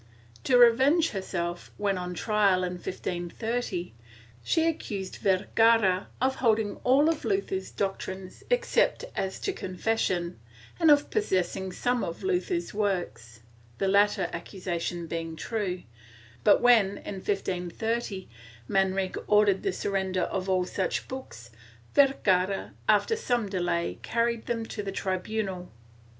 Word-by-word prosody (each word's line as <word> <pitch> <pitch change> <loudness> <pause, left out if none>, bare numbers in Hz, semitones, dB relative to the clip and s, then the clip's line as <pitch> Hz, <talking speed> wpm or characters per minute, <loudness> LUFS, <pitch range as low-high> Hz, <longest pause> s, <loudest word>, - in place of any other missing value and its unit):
To 250 - +5
revenge 265 +8 +5
herself, 175 -3 -4
when 200 -1 0
on 180 -1 -4
trial 200 -3 +2
in 180 - -1
1530, 180 +2 -4 0.5
she 325 - +2
accused 200 - -3
Vergara 200 0 +3
of 260 +2 +1
holding 220 -4 +1
all 275 +4 +4
of 325 -2 0
Luther's 390 -1 -1
doc 195 -1 -2
trines, 190 0 -7
except - - +2
as 190 0 -2
to 390 - -1
confession, 185 - -1 0.4
and 330 -2 +5
of 290 -1 +5
possessing 190 - 0
some 245 +6 0
of 170 - -5
Luther's 360 -2 -1
works 175 - -2 0.2
— 115 0 -28
the 195 - 0
latter 200 -1 +3
accusation 175 -1 -4
being 165 0 -4
true, 185 -1 -3 0.6
but - - +5
when, 225 -5 +5
in 195 - -7
1530, 195 +2 -2 0.4
Man 190 -1 +2
rique 190 -1 -2
ordered 210 -2 +4
the 390 - 0
surrender 190 - -1
of 190 0 -2
all 185 -1 +2
such 185 +1 -2
books, 120 - -8 0.4
Vergara, 195 -9 +2 0.2
after 450 - +4
some 245 - 0
delay, 175 -3 -1
carried 235 0 -1
them 230 -1 -1
to 215 - -5
the 200 -1 -4
tribunal. 190 -1 -3
195 Hz, 130 wpm, -28 LUFS, 180-235 Hz, 0.6 s, To